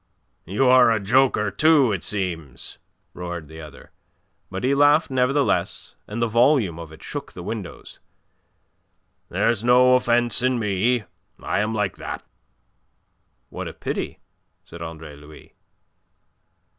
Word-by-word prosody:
"You're 125 Hz, +6 st, +5 dB
a 110 Hz, -1 st, +2 dB
joker 105 Hz, 0 st, +2 dB
too, 140 Hz, +3 st, +4 dB
it 95 Hz, -4 st, -3 dB
seems," 85 Hz, -9 st, -4 dB, 0.3 s
roared 85 Hz, -3 st, -6 dB
the 80 Hz, +1 st, -11 dB
other, 75 Hz, -2 st, -13 dB, 0.6 s
but 95 Hz, 0 st, -6 dB
he 130 Hz, +2 st, +2 dB
laughed 145 Hz, +2 st, +4 dB
nevertheless, 130 Hz, +2 st, 0 dB
and 105 Hz, +3 st, -5 dB
the 115 Hz, -, +1 dB
volume 115 Hz, -, +2 dB
of 80 Hz, -2 st, -9 dB
it 80 Hz, 0 st, -14 dB
shook -, -, -7 dB
the 90 Hz, -, -8 dB
windows. 100 Hz, -4 st, -7 dB, 1.3 s
"There's 115 Hz, -2 st, 0 dB
no 125 Hz, +1 st, +5 dB
offence 120 Hz, -2 st, +2 dB
in 125 Hz, 0 st, +1 dB
me. 110 Hz, +2 st, 0 dB, 0.4 s
I -, -, -2 dB
am 110 Hz, +2 st, -1 dB
like 105 Hz, -3 st, -1 dB
that." -, -, -7 dB, 1.2 s
"What -, -, -6 dB
a -, -, -7 dB
pity," -, -, -5 dB, 0.4 s
said 85 Hz, -, -12 dB
Andre 80 Hz, -2 st, -8 dB
Louis. 75 Hz, +1 st, -15 dB
110 Hz, 130 wpm, -23 LUFS, 85-125 Hz, 1.3 s, You're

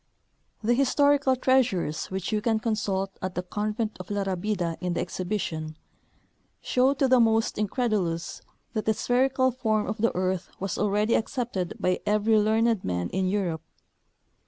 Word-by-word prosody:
The 235 Hz, +3 st, +3 dB
historical 275 Hz, +1 st, +3 dB
treasures, 240 Hz, -, +1 dB
which 190 Hz, +1 st, -4 dB
you 215 Hz, -1 st, 0 dB
can 225 Hz, -1 st, +1 dB
consult 200 Hz, -4 st, -1 dB
at 185 Hz, 0 st, -4 dB
the 180 Hz, -, -2 dB
convent 210 Hz, +3 st, -3 dB
of 185 Hz, -, -8 dB
La 205 Hz, -1 st, -1 dB
Rabida 185 Hz, -2 st, -2 dB
in 180 Hz, -1 st, -2 dB
the -, -, -1 dB
exhibition, 160 Hz, -5 st, -3 dB, 0.8 s
show 260 Hz, +2 st, +2 dB
to 270 Hz, 0 st, +2 dB
the 255 Hz, -1 st, +5 dB
most 225 Hz, -1 st, +3 dB
incredulous 205 Hz, -6 st, -1 dB, 0.3 s
that 215 Hz, -2 st, -2 dB
the 220 Hz, -, +2 dB
spherical 260 Hz, +2 st, +2 dB
form 220 Hz, -4 st, 0 dB
of 215 Hz, -, -3 dB
the 230 Hz, +1 st, +2 dB
earth 185 Hz, 0 st, -1 dB
Avas 195 Hz, -1 st, -3 dB
already 210 Hz, +2 st, +1 dB
accepted 225 Hz, -7 st, -1 dB
by 180 Hz, 0 st, +1 dB
every 215 Hz, +1 st, +3 dB
learned 220 Hz, 0 st, +2 dB
man 90 Hz, -1 st, -2 dB
in 190 Hz, 0 st, 0 dB
Europe. 185 Hz, -5 st, -1 dB
210 Hz, 155 wpm, -26 LUFS, 185-235 Hz, 0.8 s, the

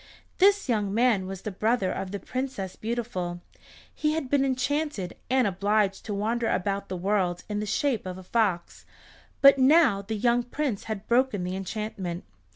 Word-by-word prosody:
This 400 Hz, 0 st, +4 dB
young 210 Hz, -5 st, 0 dB
man 220 Hz, -4 st, +2 dB
was 190 Hz, -1 st, -7 dB
the 215 Hz, -, -3 dB
brother 210 Hz, 0 st, +1 dB
of 190 Hz, -, -4 dB
the 200 Hz, -, -4 dB
Princess 255 Hz, -8 st, -4 dB
Beautiful. 220 Hz, -7 st, -3 dB, 0.5 s
He 305 Hz, 0 st, 0 dB
had 310 Hz, -5 st, -3 dB
been 285 Hz, -1 st, +3 dB
enchanted, 265 Hz, -, -1 dB
and 260 Hz, -1 st, +3 dB
obliged 200 Hz, +1 st, 0 dB
to 210 Hz, -, -3 dB
wander 225 Hz, +3 st, 0 dB
about 200 Hz, +1 st, -1 dB
the 185 Hz, -, -3 dB
world 180 Hz, -2 st, 0 dB
in 210 Hz, -1 st, -2 dB
the 210 Hz, -, -3 dB
shape 235 Hz, -1 st, 0 dB
of 180 Hz, 0 st, -5 dB
a 185 Hz, -, -10 dB
fox, 190 Hz, -4 st, -1 dB, 0.6 s
but 275 Hz, 0 st, +8 dB
now 265 Hz, -6 st, +5 dB
the 215 Hz, +2 st, -4 dB
young 240 Hz, +2 st, +2 dB
Prince 245 Hz, -2 st, -3 dB
had 215 Hz, -2 st, -5 dB
broken 240 Hz, -5 st, +2 dB
the 180 Hz, +1 st, -3 dB
enchantment. 190 Hz, -3 st, -4 dB
215 Hz, 170 wpm, -27 LUFS, 195-255 Hz, 0.6 s, but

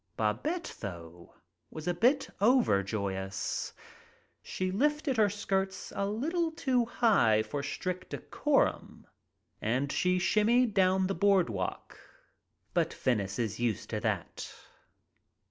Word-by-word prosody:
Babette, 335 Hz, +2 st, -1 dB
though, 85 Hz, -3 st, -9 dB, 0.3 s
was 155 Hz, +1 st, -8 dB
a 175 Hz, -, +2 dB
bit 255 Hz, -, +2 dB
overjoyous. 100 Hz, -, +1 dB, 0.7 s
She 185 Hz, 0 st, -3 dB
lifted 295 Hz, +4 st, +1 dB
her 210 Hz, -2 st, +4 dB
skirts 195 Hz, -2 st, -2 dB
a 200 Hz, -, 0 dB
little 320 Hz, -, -1 dB
too 260 Hz, -6 st, +1 dB
high 195 Hz, -, +3 dB
for 140 Hz, +6 st, -4 dB
strict 185 Hz, +5 st, -4 dB
decorum -, -, -1 dB, 0.6 s
and 130 Hz, +6 st, 0 dB
she 180 Hz, 0 st, +2 dB
shimmied 220 Hz, +5 st, +3 dB
down 190 Hz, -1 st, +3 dB
the 195 Hz, -, 0 dB
broad 195 Hz, -, +3 dB
walk, 95 Hz, -3 st, -5 dB, 0.7 s
but -, -, +1 dB
Venice 100 Hz, -6 st, 0 dB
is 110 Hz, -3 st, -2 dB
used 120 Hz, -4 st, -1 dB
to -, -, -1 dB
that. -, -, -3 dB
185 Hz, 115 wpm, -30 LUFS, -, 0.7 s, her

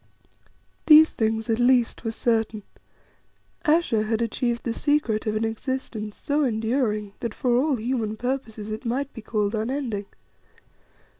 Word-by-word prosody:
These 315 Hz, 0 st, +8 dB
things 220 Hz, 0 st, -1 dB
at 225 Hz, 0 st, 0 dB
least 245 Hz, -2 st, +3 dB
were 225 Hz, -, -1 dB
certain: 225 Hz, -2 st, 0 dB, 1.0 s
Ayesha 305 Hz, -8 st, +3 dB
had 215 Hz, +1 st, -1 dB
achieved 235 Hz, +1 st, -1 dB
the 235 Hz, -, -2 dB
secret 265 Hz, -7 st, 0 dB
of 215 Hz, -, 0 dB
an 220 Hz, +1 st, 0 dB
existence 225 Hz, -2 st, -4 dB
so 295 Hz, +1 st, 0 dB
enduring 220 Hz, -3 st, 0 dB
that 235 Hz, -3 st, -4 dB
for 245 Hz, -2 st, +1 dB
all 275 Hz, +3 st, +2 dB
human 225 Hz, -2 st, -2 dB
purposes 225 Hz, -4 st, -4 dB
it 215 Hz, -, -5 dB
might 260 Hz, +4 st, -2 dB
be 225 Hz, -, -8 dB
called 210 Hz, -1 st, -1 dB
unending. 225 Hz, -2 st, -2 dB
230 Hz, 140 wpm, -25 LUFS, 215-260 Hz, 1.0 s, These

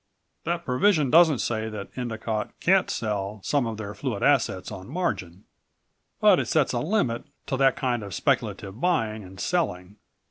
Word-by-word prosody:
"That 170 Hz, 0 st, -2 dB
provision 150 Hz, +1 st, +2 dB
doesn't 160 Hz, -4 st, +6 dB
say 110 Hz, -1 st, -2 dB
that 105 Hz, -2 st, -8 dB
Endicott 110 Hz, -3 st, -4 dB
can't 190 Hz, +1 st, +3 dB
sell 105 Hz, -1 st, -2 dB
some 140 Hz, -5 st, +1 dB
of 110 Hz, -1 st, -4 dB
their 105 Hz, -1 st, -6 dB
fluid 105 Hz, +1 st, -3 dB
assets 115 Hz, -10 st, +2 dB
on 95 Hz, 0 st, -8 dB
margin. 100 Hz, -, -3 dB, 0.8 s
But -, -, +6 dB
it -, -, -1 dB
sets -, -, +2 dB
a -, -, 0 dB
limit 150 Hz, -, 0 dB, 0.2 s
to 130 Hz, -, -2 dB
that 135 Hz, 0 st, +4 dB
kind 125 Hz, -3 st, -1 dB
of 100 Hz, -4 st, -6 dB
speculative 100 Hz, +6 st, -1 dB
buying 110 Hz, -, 0 dB
and 95 Hz, 0 st, -12 dB
selling. 100 Hz, -, -2 dB
115 Hz, 165 wpm, -26 LUFS, 100-145 Hz, 0.8 s, doesn't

